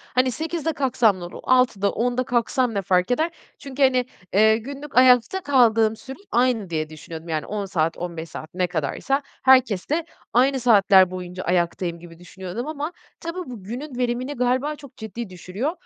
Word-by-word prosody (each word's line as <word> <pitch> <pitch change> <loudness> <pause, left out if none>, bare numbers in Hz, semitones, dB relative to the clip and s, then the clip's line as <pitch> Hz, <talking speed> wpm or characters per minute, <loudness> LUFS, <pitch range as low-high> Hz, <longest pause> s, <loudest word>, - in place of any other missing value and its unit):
hani 255 0 +3
08.00'de 325 +3 -3
kalksam 240 -8 +2
ne - - -8
olur, 175 - -8
06.00'da, 240 -6 +3
10.00'da 245 +2 0
kalksam 245 0 0
ne 200 - -1
fark 180 +3 +1
eder? 320 +7 +1 0.3
Çünkü 275 0 -2
hani, 255 -2 +3 0.3
eee, 220 +2 +5
günlük 275 +4 -8
ayakta 255 - +5
kaldığım 230 -7 +3
sürem 265 +4 -10
aynı 240 -5 +1
diye 155 -2 -2
düşünüyordum, 160 +1 -9
yani 155 -1 -2
10 205 -1 -3
saat, 165 -4 -1
15 170 -2 -6
saat, 155 +1 -9
ne 180 0 0
kadarsa, 175 - -1 0.2
herkeste 260 - +3 0.3
aynı 265 +3 +3
saatler 200 -6 +5
boyunca 180 0 -6
ayaktayım 175 -1 -1
gibi 165 -1 -13
düşünüyordum 185 - -7
ama 305 +1 -4 0.3
tabii 335 +2 -5
bu 230 -6 -9
günün 250 +6 -6
verimini 250 +2 -1
galiba 255 +4 0
çok 280 -3 -14
ciddi 220 0 -6
düşürüyor. 185 - -4
235 Hz, 165 wpm, -23 LUFS, 185-260 Hz, 0.3 s, eee